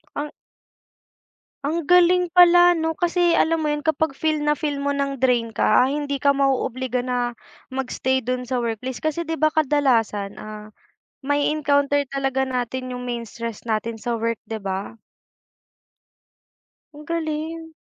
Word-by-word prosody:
Ang 295 +1 -4 1.3
Ang 315 +3 -1
galing 360 0 +4
pala, 350 0 +7
'no? 325 -1 -2
Kasi 350 -2 +2
alam 325 0 +2
mo 305 - 0
'yun, 295 -1 -2
kapag 315 -2 0
feel 310 -1 0
na 295 0 +1
feel 290 -3 -2
mo 285 0 -1
ng 275 -2 -2
drain 240 -3 +2
ka, 215 +4 +4
hindi 285 +1 -2
ka 280 +1 +3
ma-o-obliga 260 -2 0
na 245 -2 -2 0.3
mag-stay 260 0 -1
do'n 250 0 -3
sa 255 - 0
workplace 240 +2 -3
kasi 310 +2 -2
'di 325 -1 -3
ba, 310 0 +2
kadalasan, 245 -9 +1
ah, 215 0 -9 0.5
ma-e-encounter 285 0 +1
talaga 270 -1 0
natin 255 0 -3
yung 250 0 -5
main 235 -1 -3
stress 230 0 -7
natin 225 0 -2
sa 235 +2 -3
work, 230 0 0
di 225 - -5
ba? 195 0 -4 2.0
Ang 295 0 -13
galing. 320 0 -3
275 Hz, 145 wpm, -22 LUFS, 245-310 Hz, 2.0 s, pala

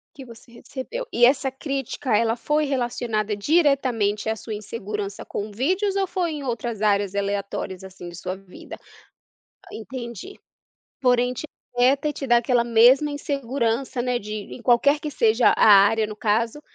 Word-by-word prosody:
Que 275 - -9
você 235 -1 -15
recebeu. 275 - -7
E 240 - +5
essa 265 +1 +2
crítica, 270 -2 -3
ela 230 +2 +1
foi 300 +5 0
relacionada 240 -6 -1
diretamente 245 -6 +1
à 220 - 0
sua 220 - -7
insegurança 210 -1 -6
com 210 +1 -5
vídeos 370 - 0
ou 390 -1 +1
foi 360 -3 -2
em 295 -2 -5
outras 235 -3 -4
áreas 200 -2 +1
aleatórias, 200 -1 -3
assim, 190 -2 -10
de 175 - -9
sua 185 +2 -5
vida? 195 -2 -12 1.0
Entendi. 235 - -8 0.6
Porém 250 -1 +2
te 255 - -6 0.3
afeta 265 +4 +3
e - - -4
te 275 - -6
dá 240 -1 +5
aquela 240 0 +2
mesma 240 +5 +5
insegurança, 265 -4 -2
né, 250 -1 0
de 210 0 -7 0.2
em 245 - -10
qualquer 280 +5 +3
que 300 - -4
seja 230 -3 +3
a - - +4
área, 210 +2 +6
no 215 - -7
caso, 230 +6 0
240 Hz, 160 wpm, -23 LUFS, 215-275 Hz, 1.0 s, área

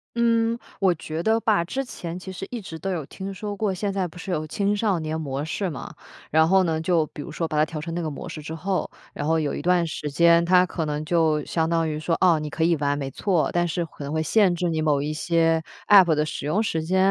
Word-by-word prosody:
嗯， 230 0 +2 0.2
我 190 -3 +4
觉 160 +1 -5
得 220 +4 +2
吧， 210 -6 +2
之 265 +9 -3
前 175 -7 -6
其 190 +1 -8
实 190 +1 -7
一 245 - -4
直 165 -5 -8
都 195 - -3
有 160 -6 -3
听 195 +5 -7
说 205 +1 -5
过， 205 -1 0
现 195 +1 -2
在 190 -2 -1
不 175 - -14
是 185 +1 -6
有 155 -2 -2
青 200 +5 0
少 205 -4 +1
年 160 0 -3
模 140 -1 -3
式 190 +3 -2
吗？ 140 - -7 0.4
然 160 +1 +5
后 190 0 +5
呢 160 -2 0
就 165 -2 +2
比 145 - -9
如 165 - -8
说 165 +1 -2
把 155 - -4
它 150 - +4
调 155 -1 -6
成 165 +2 -5
那 175 - -2
个 155 - -2
模 145 +4 -7
式 160 -2 -7
之 160 +2 -6
后， 185 +3 -2 0.2
然 145 - -3
后 160 0 +3
有 150 -2 -1
一 - - -4
段 180 -1 +3
时 150 -2 -4
间 170 +3 +5
它 180 +1 +5
可 165 -3 -3
能 150 0 -3
就 160 -3 +2
相 160 -1 0
当 165 -1 +1
于 155 0 -3
说， 165 +1 0
哦， 175 -4 +4
你 150 0 -4
可 160 +2 -2
以 170 0 +4
玩 145 0 0
没 135 -2 -4
错， 170 -5 0
但 175 0 +2
是 170 +1 -2
可 150 - -11
能 140 - -5
会 160 0 0
限 195 -2 +3
制 175 0 -1
你 160 -1 -1
某 145 -2 +2
一 150 +1 -2
些 165 0 +2 0.3
APP 185 -6 +7
的 150 +1 +1
使 150 -2 -5
用 205 +8 +1
时 160 -6 -1
间。 185 +3 0
165 Hz, 300 characters per minute, -24 LUFS, 155-185 Hz, 0.4 s, APP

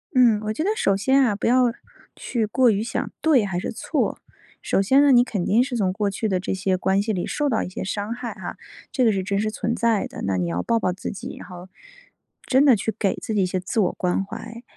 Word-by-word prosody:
嗯， 240 -4 +5
我 215 - -1
觉 270 - -2
得 390 - +1
首 200 - +2
先 265 +8 +3
啊， 225 -5 +2
不 200 - -2
要 250 0 +4 0.4
去 230 -3 -2
过 245 +4 +3
于 205 -1 0
想 230 +1 -3
对 280 -9 +4
还 185 -3 -2
是 - - -4
错。 - - -2 0.4
首 - - +1
先 265 +8 +4
呢 285 -1 +5
你 245 -1 +7
肯 205 -7 -3
定 230 +5 +3
是 255 -2 -3
从 190 -4 0
过 205 +1 -1
去 200 +3 -2
的 190 -3 0
这 185 - -2
些 190 0 0
关 190 +2 +1
系 215 +1 -1
里 180 - -2
受 295 - -1
到 230 -5 0
一 - - -5
些 185 - -6
伤 205 +3 -3
害 240 0 -6
哈， - - -7 0.3
这 260 -4 +1
个 225 - +5
是 195 -2 -1
真 200 +1 -1
实 215 +1 -1
存 230 +2 -2
在 230 -3 +1
的， - - -9
那 95 -1 0
你 90 -1 -1
要 85 +1 -2
抱 230 - +1
抱 185 - 0
自 185 - -5
己 200 - -7
然 - - -10
后， 180 0 -11 0.8
真 265 +2 +4
的 265 -4 +7
去 220 +2 -2
给 200 -4 0
自 225 - -5
己 205 -2 +2
一 - - +2
些 185 +1 -2
自 185 +5 -2
我 190 -4 +2
关 180 +1 -1
怀。 230 +3 -9
215 Hz, 280 characters per minute, -23 LUFS, 190-240 Hz, 0.8 s, 你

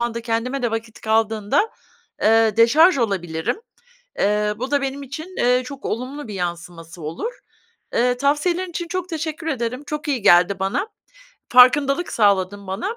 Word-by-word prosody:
zamanda 235 -1 -2
kendime 240 +3 -2
de 240 - 0
vakit 225 0 -5
kaldığında, 220 - +1 0.5
eee, 225 -1 +4
deşarj 280 +8 +5
olabilirim. 185 - -2 0.6
Eee, 210 +1 +1
bu 260 +4 -5
da 285 - +2
benim 275 +1 -4
için, 315 +7 -8
ııı, 250 +1 +3
çok 275 +2 -9
olumlu 255 +4 -4
bir 210 - -7
yansıması 170 -1 -6
olur. 165 - -5 0.6
Eee, 245 +1 +2
tavsiyelerin 335 +7 0
için 345 0 -5
çok 365 +1 -4
teşekkür 320 0 -4
ederim. 250 -1 -3
Çok 300 0 -5
iyi 265 -6 -1
geldi 185 0 +5
bana. 200 - -1 0.6
Farkındalık 275 +6 +5
sağladın 200 -2 +1
bana. 230 - -4
240 Hz, 150 wpm, -21 LUFS, 205-290 Hz, 0.6 s, deşarj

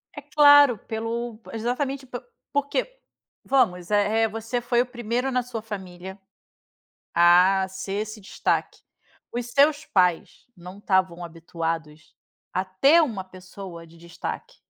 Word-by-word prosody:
É 290 - -7
claro, 290 -4 +6
pelo 225 +1 -5
exatamente, 265 +4 -2
po 245 -1 -7 0.3
porque - - -2 0.4
vamos, 210 -9 +1
eh 210 +2 +2
eh, - - +3
você 225 +3 -4
foi 240 0 +2
o - - -1
primeiro 245 +1 -3
na 250 -1 0
sua 235 -2 -6
família 190 -3 -8 1.0
a 180 +3 +5
ser 190 +1 -6
esse 215 0 -8
destaque. 190 - -2 0.5
Os 240 0 -3
seus 290 +4 +3
pais 180 -3 0
não 180 +3 -11
estavam 185 -3 0
habituados 165 -2 -6 0.4
a 185 - -1
ter 275 - +4
uma 215 -10 -2
pessoa 185 -2 -11
de 165 +1 -18
destaque. 175 - -7
215 Hz, 130 wpm, -24 LUFS, 185-250 Hz, 1.0 s, claro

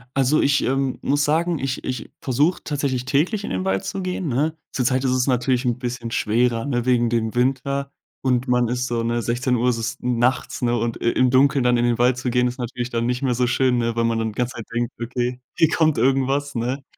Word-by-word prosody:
Also, 135 +3 +3
ich, 140 +1 +2
ähm, 135 0 0
muss 145 +1 +1
sagen, 160 +2 +1
ich 135 0 -3
ich 125 -3 -4
versuche 145 +7 +1
tatsächlich 135 -4 -2
täglich 160 +10 +1
in - - -5
den 95 0 -2
Wald 95 0 0
zu 195 - -3
gehen, 180 -2 -3
ne? 150 +5 0
Zurzeit 130 +1 0
ist 130 - +1
es 130 +1 +1
natürlich 125 0 +1
'n 120 -1 0
bisschen 120 -2 -5
schwerer, 115 +2 +1
ne? 120 -4 -1
Wegen 120 -2 +2
dem 115 -1 -1
Winter 140 +2 0 0.3
und 125 -1 +1
man 125 -1 +2
ist 125 +2 -1
so, 120 -1 -1
ne, 120 +1 0
16:00 125 +1 0
ist 115 - 0
es 115 0 -3
nachts, 125 +1 0
ne? 120 0 +2
Und 115 0 -1
i 115 - +2
im 130 0 +3
Dunkeln 135 +1 +3
dann 125 -1 +3
in 120 - +1
den 120 -1 +1
Wald 125 +1 +3
zu 125 0 -2
gehen 125 0 +2
ist 125 - -5
natürlich 120 0 -4
dann 115 -1 -1
nicht 125 0 -1
mehr 130 -3 +1
so 125 - +2
schön, 125 0 +2
ne? 115 -1 -1
Weil 115 - +1
man 115 0 +1
dann 110 - -1
die 105 - -12
ganze 125 +1 -1
Zeit 115 - -7
denkt: 120 0 -1
„Okay, 125 +1 -2 0.2
hier 160 - +4
kommt 155 -2 +2
irgendwas“, 135 +3 +1
ne? 125 +4 -2
125 Hz, 235 wpm, -22 LUFS, 120-135 Hz, 0.3 s, hier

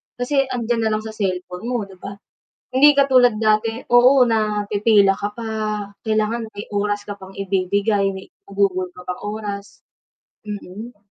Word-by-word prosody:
Kasi 270 +2 0
'andiyan 235 -3 -1
na - - 0
lang 215 - -4
sa 220 - -6
cellphone 185 -1 -4
mo 245 -3 -1
'di 190 -2 -13
ba? 200 0 -7 0.6
Hindi 290 +2 +6
katulad 255 -5 +5
dati 225 +2 +1
oo, 250 +2 +7
na 215 -3 0
pipila 205 -1 +4
ka 205 +1 -4
pa, 230 - -5 0.6
kailangan 220 +1 -1
may 205 -1 -8
oras 205 0 -1
ka 205 - -5
pang 190 -1 -13
ibibigay, 195 +1 0
may 190 -1 -7 0.2
igugugol 195 -2 0
ka 180 0 -14
pang 180 - -5 0.2
oras 200 -1 -7 0.6
mm. 205 +2 -8
210 Hz, 155 wpm, -21 LUFS, 200-230 Hz, 0.6 s, oo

